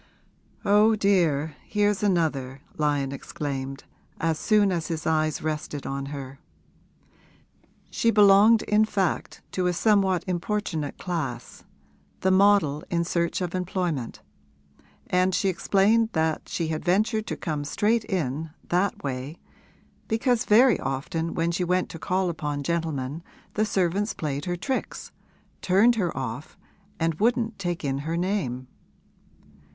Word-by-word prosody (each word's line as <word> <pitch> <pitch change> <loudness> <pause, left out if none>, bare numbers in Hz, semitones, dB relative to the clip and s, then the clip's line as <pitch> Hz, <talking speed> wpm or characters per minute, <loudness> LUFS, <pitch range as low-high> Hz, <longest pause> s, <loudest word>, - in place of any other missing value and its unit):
'Oh, 210 +2 +5
dear, 165 -8 +1
here's 210 -1 0
another!' 150 -9 0
Lyon 145 -3 0
exclaimed, 135 -1 -5 0.4
as 165 -1 0
soon 210 -2 +3
as 170 -4 -2
his 160 -2 -4
eyes 155 -1 0
rested 150 -2 -4
on 140 0 -4
her. 140 -1 -7 1.5
She 230 - +1
belonged, 210 +1 +6
in 210 +1 +3
fact, 195 -5 -2
to 185 -1 0
a 180 - +1
somewhat 195 -1 +2
importunate 180 -4 -2
class 135 -10 -5 0.6
the 190 - +2
model 185 -7 +4
in 170 -1 +1
search 170 +1 -1
of 175 -2 -3
employment, 180 - -3 0.8
and 185 0 +2
she 195 - +1
explained 205 +5 +2
that 160 -1 -1
she 165 -2 -2
had 155 -1 -3
ventured 215 +4 +1
to - - -3
come 150 -4 -3
straight 215 +10 +1
in, 160 - -2 0.2
that 180 +3 0
way, 135 +3 -4 0.7
because 230 +1 +1
very 235 0 +5
often 150 +5 -3
when 165 +1 +1
she 180 +1 -1
went 180 +1 0
to 165 - -8
call 185 +3 0
upon 145 -3 -4
gentlemen 155 -2 -2 0.3
the 215 - +1
servants 200 +2 0
played 145 -2 -3
her 175 -1 -1
tricks, 260 +9 -4 0.5
turned 200 +6 +4
her 190 -7 -1
off 130 +3 -5 0.4
and 165 -1 0
wouldn't 230 0 +1
take 175 -4 -3
in 135 0 -1
her 160 +4 -3
name. 170 -10 -2
175 Hz, 135 wpm, -25 LUFS, 150-200 Hz, 1.5 s, belonged